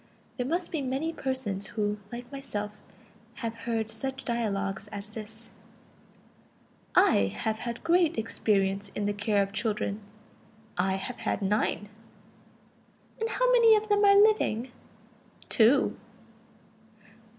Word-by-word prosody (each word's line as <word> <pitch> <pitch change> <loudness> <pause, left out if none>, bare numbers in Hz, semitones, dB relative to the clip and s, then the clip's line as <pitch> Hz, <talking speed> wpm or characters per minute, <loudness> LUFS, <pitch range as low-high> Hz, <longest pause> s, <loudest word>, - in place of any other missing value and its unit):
There 250 -1 -1
must 345 +4 -1
be 315 - -1
many 275 +5 -2
persons 260 -10 -3
who, 210 -1 -2
like 240 +2 -8
myself, 210 -7 -5 0.5
have 230 -3 -4
heard 225 -1 -3
such 265 +4 -5
dialogues 200 -4 -2
as 205 0 -7
this: 220 +1 -9 1.4
"I 100 - +5
have 220 0 -1
had 235 -1 -5
great 335 -1 +3
experience 200 -3 0
in 205 - -1
the 205 - 0
care 205 0 +1
of 195 - -6
children; 210 -1 -1 0.7
I 190 +2 +1
have 195 +6 -5
had - - -1
nine." 205 +1 0 1.3
"And 450 0 -1
how - - +2
many 465 -3 +7
of 430 0 -1
them 410 0 +3
are 400 0 +7
living?" 265 - +3 0.8
"Two." 240 +5 +4
225 Hz, 125 wpm, -28 LUFS, 205-275 Hz, 1.4 s, many